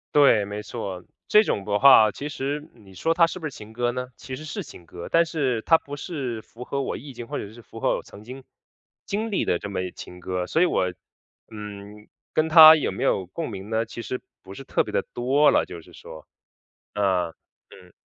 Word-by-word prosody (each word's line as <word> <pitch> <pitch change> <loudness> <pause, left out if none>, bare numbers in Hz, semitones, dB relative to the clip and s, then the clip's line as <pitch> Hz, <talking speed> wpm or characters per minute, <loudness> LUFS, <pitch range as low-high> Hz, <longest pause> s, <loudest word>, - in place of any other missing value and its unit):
对， 120 -8 +5
没 105 +1 -6
错。 95 -7 -6 0.2
这 210 +1 +6
种 100 - -2
的 105 -1 +1
话 110 -3 +8
其 145 +1 -6
实 145 +2 -4
你 100 -5 -18
说 165 - 0
它 165 0 +5
是 185 - -6
不 160 - -7
是 150 - -3
情 110 -2 -12
歌 120 +1 0
呢？ 125 +1 -4
其 130 +1 -8
实 155 - -9
是 150 - -5
情 85 - -14
歌， 85 +1 -9
但 170 0 +5
是 135 -8 -1
它 165 - +5
不 145 -2 -9
是 135 -8 -4
符 115 +3 -11
合 140 +2 -3
我 - - -3
意 145 - -9
境 120 -2 -9
或 - - -4
者 100 - -6
是 120 - -13
符 - - -12
合 - - +2
我 - - -6
曾 105 - -14
经 130 +4 -9 0.6
经 220 +3 -2
历 200 - 0
的 85 - 0
这 105 - -6
么 100 - -2
一 90 - -4
情 90 0 -11
歌。 90 0 -3
所 160 - +1
以 180 - +6
我， 95 - +1 0.6
嗯， 105 0 -9 0.2
跟 155 0 +1
它 160 0 +10
有 145 - -2
没 - - -4
有 95 - +1
共 155 - -5
鸣 100 +1 -8
呢， 115 0 0
其 115 +1 -8
实 125 +3 -5 0.2
不 95 - -11
是 135 - -9
特 - - 0
别 - - -8
地 - - +2
多 135 +5 +3
了， - - +3
就 85 -2 -9
是 - - -18
说。 80 - -12 0.7
啊。 95 -4 +1 0.4
嗯。 90 -1 -16
120 Hz, 250 characters per minute, -24 LUFS, 100-145 Hz, 0.7 s, 它